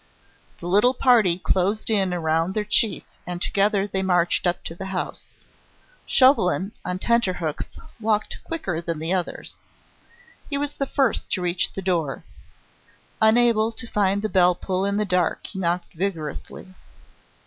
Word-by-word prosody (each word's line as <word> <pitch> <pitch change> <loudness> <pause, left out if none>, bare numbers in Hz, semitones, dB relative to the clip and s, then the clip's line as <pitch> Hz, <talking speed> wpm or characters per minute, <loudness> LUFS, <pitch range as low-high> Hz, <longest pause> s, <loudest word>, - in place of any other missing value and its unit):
The - - -9
little 210 +8 +3
party 225 -10 +4
closed 195 +4 0
in 195 -4 +2
around 165 +1 0
their 215 - 0
chief 210 +1 +2 0.2
and 175 -1 -3
together 200 +1 +1
they 190 -1 -2
marched 180 -1 +2
up 175 - -1
to - - -6
the 190 +3 -7
house. 190 -1 -4 0.8
Chauvelin, 200 -7 +4
on 180 0 -3
tenterhooks, 185 -8 -1 0.2
walked 215 -1 -1
quicker 190 - -3
than 165 -1 -3
the 160 +4 -1
others. 180 -2 -3 0.9
He 280 - -1
was 290 0 -2
the 275 - -3
first 270 -5 0
to 185 - 0
reach 175 0 +1
the 195 - -5
door. 170 -7 -1 1.0
Unable 225 0 +4
to 245 - -5
find 200 -2 0
the - - +1
bell 180 -3 +4
pull 185 +1 -2
in 200 0 0
the 210 - +1
dark, 180 -3 0
he 190 - -6
knocked 175 0 -1
vigorously. 175 0 -5
190 Hz, 150 wpm, -23 LUFS, 175-215 Hz, 1.0 s, party